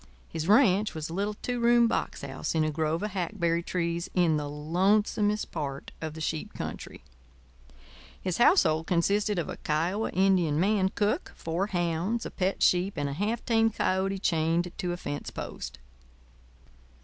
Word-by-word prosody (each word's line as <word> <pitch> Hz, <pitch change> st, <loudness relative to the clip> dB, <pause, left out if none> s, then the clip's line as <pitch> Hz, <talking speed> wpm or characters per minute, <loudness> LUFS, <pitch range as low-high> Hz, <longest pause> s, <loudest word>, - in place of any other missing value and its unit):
His 160 Hz, 0 st, -4 dB
ranch 210 Hz, -2 st, +4 dB
was 155 Hz, 0 st, -4 dB
a -, -, -6 dB
little 205 Hz, +3 st, -1 dB
two 245 Hz, -1 st, -2 dB
room 235 Hz, 0 st, +5 dB
box -, -, -2 dB
house -, -, -4 dB
in 160 Hz, -, +3 dB
a 155 Hz, -, 0 dB
grove 160 Hz, +3 st, -1 dB
of 210 Hz, -, -2 dB
hackberry 170 Hz, -2 st, 0 dB
trees 170 Hz, -1 st, -2 dB
in 175 Hz, -4 st, +3 dB
the 145 Hz, -1 st, -2 dB
lonesomest 205 Hz, +7 st, +1 dB
part 140 Hz, -4 st, -5 dB
of 160 Hz, -1 st, -5 dB
the 160 Hz, -, -7 dB
sheep 155 Hz, 0 st, -3 dB
country. -, -, -7 dB, 1.2 s
His 185 Hz, +1 st, -3 dB
household 165 Hz, -, +4 dB
consisted 200 Hz, +4 st, +1 dB
of 170 Hz, -, -1 dB
a -, -, -6 dB
Kiowa 170 Hz, +8 st, -1 dB
Indian 180 Hz, -5 st, +2 dB
man 195 Hz, +1 st, +2 dB
cook, 210 Hz, -, -1 dB
four 170 Hz, +4 st, -2 dB
hounds, 175 Hz, +4 st, -1 dB
a -, -, -5 dB
pet 190 Hz, 0 st, -1 dB
sheep, 185 Hz, +2 st, +3 dB
and 145 Hz, -1 st, -1 dB
a -, -, -4 dB
half 210 Hz, +9 st, -2 dB
tamed 225 Hz, -2 st, +2 dB
coyote 190 Hz, +1 st, 0 dB
chained 170 Hz, -1 st, +1 dB
to 180 Hz, -2 st, -1 dB
a 175 Hz, -, -3 dB
fence 145 Hz, -4 st, -5 dB
post. -, -, -7 dB
180 Hz, 165 wpm, -28 LUFS, 160-205 Hz, 1.2 s, room